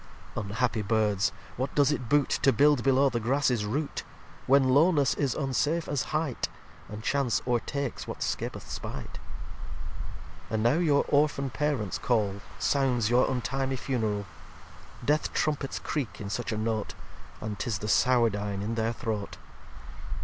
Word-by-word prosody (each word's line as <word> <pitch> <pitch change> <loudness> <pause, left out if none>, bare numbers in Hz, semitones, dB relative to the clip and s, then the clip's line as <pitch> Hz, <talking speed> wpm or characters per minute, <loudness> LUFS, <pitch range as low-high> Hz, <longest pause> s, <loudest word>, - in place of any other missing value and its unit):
lii - - -1
Unhappy 115 +2 0
Birds! 105 -2 +1 0.3
what 130 +3 -2
does 145 0 +4
it 130 -5 -3
boot 145 -1 +3
To 135 - +5
build 145 -1 +4
below 135 +1 +4
the 120 -2 -1
Grasses 125 -2 +1
Root; 145 +7 -2 0.5
When 135 0 +5
Lowness 145 -2 +4
is 140 -3 0
unsafe 150 +4 0
as 145 -3 -1
Hight, 155 -5 -1 0.4
And 105 +1 -7
Chance 135 -2 +1
o'retakes 130 +2 -2
what - - -4
scapeth - - -3
spight? - - -6 1.3
And 110 -1 0
now 125 +8 +4
your 150 -5 +3
Orphan 140 -2 +2
Parents 130 -6 -1
Call 105 -5 0 0.2
Sounds 125 -5 +1
your 125 +1 +4
untimely 130 +2 -1
Funeral. 110 -6 -1 0.8
Death 150 +1 +1
Trumpets 145 -3 0
creak 140 -7 -3
in 100 -1 -5
such 120 +2 -2
a 110 - -2
Note, 110 -1 -2 0.4
And 105 -2 -5
'tis 110 0 -1
the 105 - -5
Sourdine 105 -4 +2
in 110 +3 -2
their 115 0 0
Throat. 110 -4 -4
125 Hz, 145 wpm, -28 LUFS, 110-140 Hz, 1.3 s, To